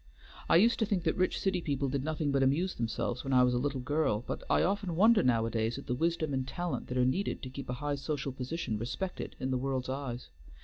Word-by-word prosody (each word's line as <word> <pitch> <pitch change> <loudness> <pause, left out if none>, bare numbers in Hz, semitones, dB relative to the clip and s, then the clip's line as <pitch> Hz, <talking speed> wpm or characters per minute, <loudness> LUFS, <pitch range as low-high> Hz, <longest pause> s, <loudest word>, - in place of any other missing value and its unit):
I - - +6
used 225 +7 +5
to 220 - +3
think 200 -5 0
that 160 - +1
rich 185 0 +1
city 190 -2 0
people 140 -3 -1
did 135 0 -1
nothing 155 -1 -1
but 140 -1 +2
amuse 150 +8 +2
themselves, 120 +1 -2
when 135 - -2
I 125 0 +6
was 125 0 +3
a 120 - +1
little 135 0 -1
girl; 145 -5 0
but - - -4
I - - +4
often 195 -3 0
wonder 220 +5 +6
nowadays 115 -1 +1
at - - -8
the - - -1
wisdom 160 +1 0
and 130 -1 -1
talent 175 +3 -3
that 125 - -3
are 125 - +4
needed 185 +11 -1
to 130 - -6
keep 135 0 -7
a - - -1
high 145 +3 -2
social 140 -1 -3
position 130 -3 -3
respected 125 - -4
in 130 - -2
the 130 - +1
world's 130 -1 -2
eyes. 130 -2 -4
140 Hz, 245 wpm, -31 LUFS, 125-165 Hz, -, I